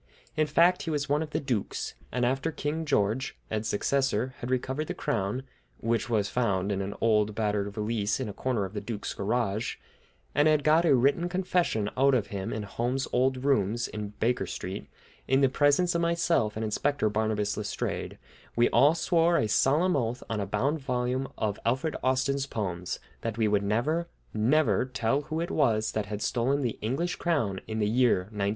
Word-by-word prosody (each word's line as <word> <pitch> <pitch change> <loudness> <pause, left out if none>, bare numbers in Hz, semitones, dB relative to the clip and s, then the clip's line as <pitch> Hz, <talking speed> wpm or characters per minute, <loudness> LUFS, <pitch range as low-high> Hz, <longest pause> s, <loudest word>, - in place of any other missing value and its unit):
In 155 -1 +2
fact, 170 +4 +4
he - - -4
was 145 -2 -1
one 145 +2 +1
of 160 - -4
the - - -1
dukes, 125 -8 -2 0.2
and 125 -1 0
after 135 +6 0
King 155 +1 -3
George, 130 -2 0
Ed's 110 0 -1
successor, 130 +2 0
had 120 - -5
recovered 130 +4 -1
the - - -4
crown, 105 +4 -1 0.3
which 115 0 -1
was 105 -3 +1
found 100 -5 0
in 100 -1 -1
an 100 +1 -4
old 105 -2 +2
battered 105 -2 0
valise 105 +1 -1
in 130 - -2
a 105 - -5
corner 120 -5 -1
of 95 - -8
the 105 - -3
duke's 105 0 -4
garage, 110 +1 -1 0.6
and 145 +1 +4
had 155 -2 +3
got 155 +3 +4
a 150 - +5
written 140 +8 +2
confession 180 - 0
out 135 +1 +4
of 110 -5 0
him 95 -1 -3
in 110 - -3
Holmes's 120 +6 -2
old 130 +1 +1
rooms 120 -3 +2
in 105 -1 -6
Baker 120 +2 +1
Street, - - -5 0.4
in 135 +1 +3
the 135 - +5
presence 145 +6 +3
of 170 - +1
myself 170 -10 +1
and 110 +1 -2
Inspector 140 +3 0
Barnabas 105 -1 0
Letstrayed, 105 -1 -3 0.4
we 120 +1 +4
all 145 +4 +5
swore 170 0 +3
a 110 - +1
solemn 150 - +3
oath, 120 -2 -1
on 110 -1 -2
a 100 - -2
bound 140 +9 0
volume 125 0 -1
of 105 -2 -1
Alfred 130 +6 0
Austin's 135 +2 +1
poems, 90 -7 -3 0.2
that 115 -1 -3
we 110 -2 +2
would 105 -1 +2
never, 130 +12 0 0.3
never 130 +10 +3
tell 130 +1 0
who 155 +2 -4
it 170 - -3
was 110 -7 +2
that 105 -2 -2
had 105 0 -4
stolen 130 +4 +1
the 120 -4 -2
English 140 +11 -1
crown 115 - 0
in 110 - -3
the 105 - +1
year 120 -3 +3
1910! 100 -2 -1
125 Hz, 190 wpm, -28 LUFS, 105-145 Hz, 0.6 s, a